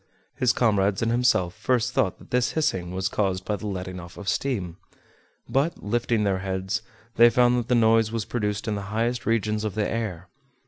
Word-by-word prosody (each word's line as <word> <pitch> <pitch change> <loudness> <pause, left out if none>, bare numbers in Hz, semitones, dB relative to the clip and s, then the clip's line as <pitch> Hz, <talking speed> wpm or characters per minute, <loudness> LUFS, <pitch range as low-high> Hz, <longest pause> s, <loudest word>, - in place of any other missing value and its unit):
His 125 -1 +2
comrades 100 -3 +2
and 115 - +1
himself 115 -8 +2
first 125 +2 0
thought 95 - +1
that - - -17
this 125 0 +1
hissing 95 - 0
was 95 +1 -2
caused 95 -2 -1
by 105 - -1
the 105 - -6
letting 95 -2 -5
off 85 +2 -11
of 100 - -9
steam; 95 -9 -1 0.7
but 145 +5 0
lifting 115 0 0
their 95 -2 +1
heads, 95 0 -2 0.4
they 120 +1 +8
found 125 0 +4
that 120 - -4
the 125 - +2
noise 115 -1 +4
was 115 -2 -2
produced 105 -3 -2
in 110 - 0
the 100 - -3
highest 115 +3 -1
regions 110 -1 0
of 105 -3 -3
the 105 -1 0
air. 100 -6 -4
110 Hz, 195 wpm, -25 LUFS, 95-120 Hz, 0.7 s, they